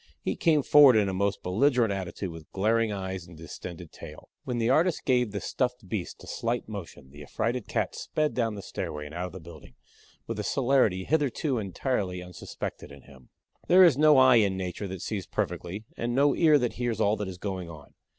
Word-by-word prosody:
He - - -3
came 160 -8 +2
forward 145 -4 +7
in 105 -2 +3
a - - -3
most 100 +2 -1
belligerent 115 +3 +2
attitude 95 -1 -5
with 80 -1 -12
glaring 110 +3 +1
eyes 95 -3 -5
and 85 -2 -13
distended 85 +1 -9
tail. - - -12 0.2
When 125 - -2
the 115 -1 0
artist 165 +4 +2
gave 125 -3 +2
the 100 0 -4
stuffed 125 -3 -2
beast 95 -2 -5
a - - -12
slight 120 +1 -2
motion 85 -10 -9
the 75 +1 -12
affrighted 115 - -3
cat - - -1
sped 155 -1 -2
down 115 -3 -1
the 100 - -8
stairway 75 -3 -5
and 75 - -10
out 90 +2 -3
of - - -11
the 95 - -9
building 80 -6 -13 0.5
with 115 - -5
the 105 - -3
celerity 125 -8 +2
hitherto 145 -2 0
entirely 100 -2 -2
unsuspected 90 -4 -7
in 70 -2 -13
him. 65 -2 -18 0.4
There 185 +1 +7
is 170 -7 +6
no 150 0 +5
eye 130 -2 +7
in 100 -4 +2
Nature 95 +2 -4
that 95 -1 -7
sees 100 -6 -4
perfectly 95 +5 -4
and 120 +1 -2
no 140 +1 +3
ear 155 -3 +5
that 125 -4 -1
hears 120 -3 -1
all 105 +1 +3
that 105 - -4
is 95 -1 -7
going 95 -3 -5
on. 75 -3 -13
105 Hz, 210 wpm, -27 LUFS, 90-125 Hz, 0.5 s, forward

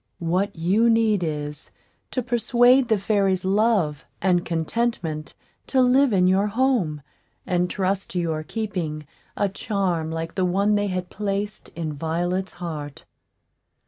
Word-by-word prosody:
What 185 +4 -1
you 195 +8 +3
need 220 -4 +3
is, 150 -2 -4 0.4
to 255 - -2
persuade 245 +2 +4
the 220 -2 +3
fairies 195 -2 +1
Love 195 -7 +2 0.2
and 180 -2 +2
Contentment 165 -2 -2 0.3
to 265 - +1
live 255 +1 +4
in 185 -3 +3
your 190 +3 +3
home, 210 - 0 0.4
and 180 -1 +1
trust 195 0 -1
to 180 - 0
your 160 -2 -1
keeping 165 -5 -4 0.3
a 205 - +2
charm 190 -5 -1
like 165 0 -4
the 190 - 0
one 195 +4 +2
they 205 0 +1
had 185 -2 -3
placed 205 +1 -3
in 160 -2 -3
Violet's 175 +5 -2
heart. 155 -5 -7
190 Hz, 140 wpm, -24 LUFS, 165-215 Hz, 0.4 s, persuade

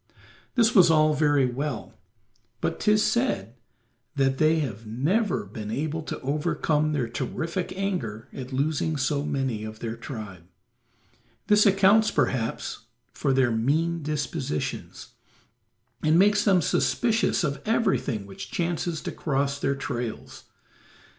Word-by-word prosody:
This 235 -1 +4
was 185 -7 +7
all 155 -1 +4
very 145 -3 +3
well, 130 +1 -4 0.7
but - - -2
'tis 210 0 +3
said 215 - 0 0.6
that 135 -1 +1
they 155 +1 +4
have 115 -8 -4
never 160 - 0
been 105 +1 -7
able 155 +7 -2
to 155 - -6
overcome 150 +1 0
their 140 -6 0
terrific 165 +9 -3
anger 175 - -3
at 130 0 -7
losing 150 +3 0
so 140 +1 0
many 135 -7 -2
of 110 0 -7
their 115 0 -4
tribe; 105 - -8 1.0
this 210 0 +5
accounts 200 +3 +5
perhaps 125 -5 -1 0.3
for - - 0
their 130 -2 +3
mean 155 +9 +1
dispositions, 140 - -4 0.9
and 155 +1 +3
makes 205 +3 +4
them 190 -5 +4
suspicious 230 +5 +1
of 140 -3 -2
everything 195 - 0
which 100 -1 -9
chances 170 -1 -2
to - - -4
cross 140 -1 -1
their 140 0 0
trails. 125 -4 -5
145 Hz, 125 wpm, -26 LUFS, 125-170 Hz, 1.0 s, was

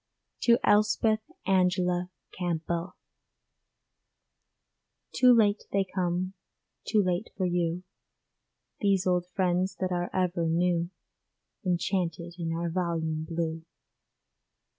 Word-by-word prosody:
TO 235 -1 +5
ELSPETH 215 +1 +3 0.3
ANGELA 180 -1 +2 0.2
CAMPBELL 170 0 -3 2.2
Too 255 -1 +5
late 215 -3 +4
they 195 -1 +2
come, 185 0 -1 0.5
too 215 -2 +3
late 185 +4 -1
for 190 - 0
you, 175 0 0 1.0
These 195 -3 +2
old 180 -1 +1
friends 185 0 +1
that 185 -1 -1
are 175 0 -1
ever 175 -2 0
new, 170 +1 +1 0.7
Enchanted 175 -2 -1
in 165 -1 -2
our 170 +1 -2
volume 160 -3 -1
blue. 165 -1 -2
180 Hz, 95 wpm, -28 LUFS, 170-190 Hz, 2.2 s, TO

